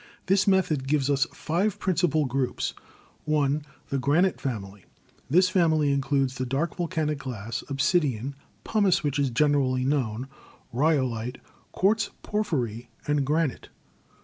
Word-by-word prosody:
This 195 +1 +3
method 165 -8 +2
gives 145 -1 +2
us 140 -1 +2
five 185 +6 -1
principal 170 -5 +1
groups: 130 0 -1 0.6
(i) 145 0 +2 0.3
The 135 - 0
Granite 160 +8 +2
Family. 100 -6 -5 0.4
This 180 +6 +5
family 160 -6 +3
includes 135 -1 0
the 130 - 0
dark 140 +7 -1
volcanic 155 -4 -1
glass, 115 -4 -5
obsidian; 135 - +1 0.3
pumice, 200 -6 +2
which 145 0 0
is 140 -2 +2
generally 130 -1 +2
known; 130 -3 -1 0.5
rhyolite, 130 -4 +1 0.3
quartz 215 +4 +2
por 210 0 0
phyry 120 - -2 0.2
and 150 -1 +1
granite. 150 0 -1
145 Hz, 125 wpm, -26 LUFS, 130-165 Hz, 0.6 s, This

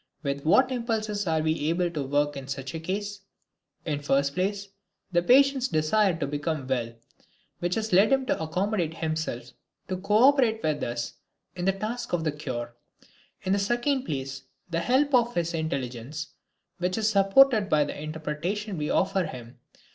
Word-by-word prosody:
With 140 0 -3
what 255 - +5
impulses 215 -5 -2
are 160 -1 +1
we 155 -1 0
able 175 +1 +1
to 155 -3 -3
work 145 +2 0
in 135 -1 -7
such 135 -1 -5
a 165 - -4
case? 200 +4 -4 0.7
In 150 -3 -1
the - - -14
first 140 0 +2
place, 200 +3 -2 0.4
the 175 -1 +3
patient's 265 +5 +4
desire 175 +4 +2
to 165 - -1
become 145 0 -2
well, 120 -3 -2 0.6
which 175 +1 -1
has 220 -2 -2
led 195 +6 +6
him 270 -1 +3
to 250 - -1
accommodate 170 +1 -1
himself 155 -7 -3 0.4
to 185 - -1
co 210 +4 +3
operate 245 -6 +2
with 155 -2 0
us 120 0 -3 0.4
in 175 -1 -3
the 195 - +4
task 220 +4 -5
of 170 -2 +1
the 155 - +1
cure; 120 -5 -5 0.7
in 190 - +1
the 200 - +2
second 240 +6 0
place, 135 - -4 0.3
the 165 - 0
help 265 +9 +2
of 240 -1 +3
his 170 0 0
intelligence, 145 -2 -4 0.5
which 180 +2 -1
is 220 -1 +1
supported 205 +2 +5
by 150 -1 +4
the 145 - -5
interpretation 160 +6 -3
we 150 - -2
offer 190 -1 +1
him. 125 -3 -9
170 Hz, 175 wpm, -27 LUFS, 145-210 Hz, 0.7 s, led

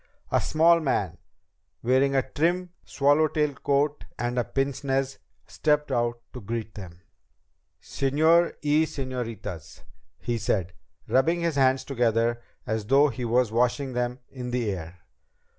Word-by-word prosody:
A - - +3
small 165 +2 +4
man, 100 - -1 0.6
wearing 130 +3 +3
a 135 -1 +1
trim 175 +5 0
swallowtail 150 +1 +2
coat 140 +2 0
and 120 +1 -1
a - - +2
pince 135 +3 -2
nez, 135 0 -1 0.3
stepped 150 -1 0
out 120 0 0
to 125 - -8
greet 110 +1 -5
them. 90 -3 -10 0.8
"Señor 160 +5 +2
y 150 +2 +3
señoritas," 115 - -6 0.3
he 120 -1 -3
said, 95 -5 -1 0.3
rubbing 165 +7 +2
his 170 -1 0
hands 130 -1 +3
together 120 -3 0 0.2
as 110 -2 -3
though 140 +4 +5
he 125 -2 -5
was 120 -1 +2
washing 125 +3 0
them 125 0 -1
in 125 -2 -6
the 120 -4 -1
air. 90 -1 -7
130 Hz, 135 wpm, -26 LUFS, 115-145 Hz, 0.8 s, though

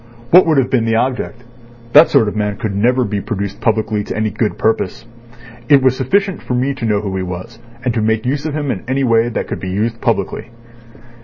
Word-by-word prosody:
What 180 0 +7
would 155 -3 +3
have 130 -1 +1
been 120 -4 +2
the 115 0 +1
object? 125 0 -2 0.5
That 150 +3 +8
sort 130 -7 +3
of 105 - -3
man 105 -1 -1
could 105 -3 -3
never 125 +5 +2
be 105 -4 -2
produced 100 -3 -4
publicly 110 -2 0
to - - -5
any 110 -1 0
good 105 +1 -2
purpose. 110 - -1 0.6
It 140 -2 +6
was 130 -1 +3
sufficient 195 +9 0
for 125 - -3
me 130 +3 0
to 115 - -5
know 105 -2 +1
who 100 -2 -4
he - - -2
was, 95 +6 -7 0.3
and 125 - +1
to 115 - -1
make 110 +1 0
use 140 +4 -1
of 150 - -4
him 145 -3 -1
in 95 - -5
a 135 +1 0
way 115 -1 +3
that 120 - -3
could - - -4
be 95 - -5
used 110 +4 -2
publicly." - - -1
115 Hz, 230 wpm, -17 LUFS, 105-130 Hz, 0.6 s, That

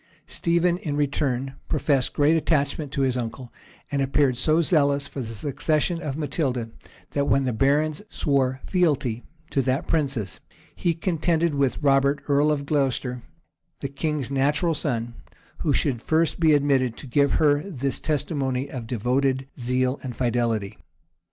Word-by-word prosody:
Stephen, 170 0 +1
in 150 -5 -3
return, 135 -2 -1
professed 135 -4 +1
great 150 +2 +3
attachment 150 -2 0
to 140 - -1
his 130 -2 +1
uncle, 125 +1 -5 0.4
and 140 -1 0
appeared 135 -1 +2
so 155 +6 +2
zealous 145 -4 +2
for 140 - -6
the 115 -2 -6
succession 150 - 0
of 145 -3 -4
Matilda, 130 -7 -2 0.4
that, 140 -1 0
when 135 0 +3
the 125 -2 -1
barons 145 - +1
swore 130 -2 0
fealty 145 - +1 0.3
to 135 - +2
that 130 +4 0
princess, 135 - -1 0.4
he 170 -2 0
contended 165 -1 0
with 140 0 0
Robert, 140 0 +3
earl 145 +1 +3
of 140 -2 -1
Glocester, 135 -4 0 0.6
the 140 - -3
king's 140 -1 -2
natural 145 +5 +2
son, 120 -6 -2 0.5
who 155 - 0
should 130 -4 0
first 160 +4 +1
be 160 -2 +5
admitted 135 -4 +1
to - - -9
give 140 +2 +2
her 145 -2 +3
this 140 -8 -3
testimony 140 -3 -1
of 120 -4 -6
devoted 130 +3 0
zeal 125 +2 0
and 125 -3 -6
fidelity. 115 -4 -1
140 Hz, 150 wpm, -24 LUFS, 130-150 Hz, 0.6 s, be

